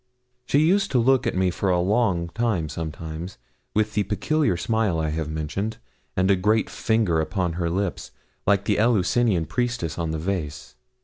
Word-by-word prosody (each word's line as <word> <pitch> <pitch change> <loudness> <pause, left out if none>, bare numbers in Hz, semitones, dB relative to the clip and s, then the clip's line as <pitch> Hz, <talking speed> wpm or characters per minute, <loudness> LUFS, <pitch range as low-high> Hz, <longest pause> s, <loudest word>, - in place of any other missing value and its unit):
She - - +2
used 190 +7 +3
to - - +4
look 130 +1 +3
at - - -1
me 95 -1 +2
for 95 +2 -1
a 90 -1 +3
long 95 -3 +1
time 100 -7 -1
sometimes, 80 +2 -6 0.4
with 110 0 +1
the 105 - +2
peculiar 125 - 0
smile 110 -3 0
I 80 -1 0
have 80 0 -3
mentioned, 80 +8 -3 0.4
and 95 +1 +3
a - - +5
great 105 +4 +1
finger 110 -8 +1
upon 90 +1 -1
her 85 0 -1
lip, 95 +2 -1 0.5
like 100 -1 +3
the 105 - +1
Eleusinian 110 -4 +2
priestess 120 -8 -2
on 85 -1 -1
the 80 - -2
vase. 80 -4 -4
95 Hz, 175 wpm, -24 LUFS, 85-110 Hz, 0.5 s, a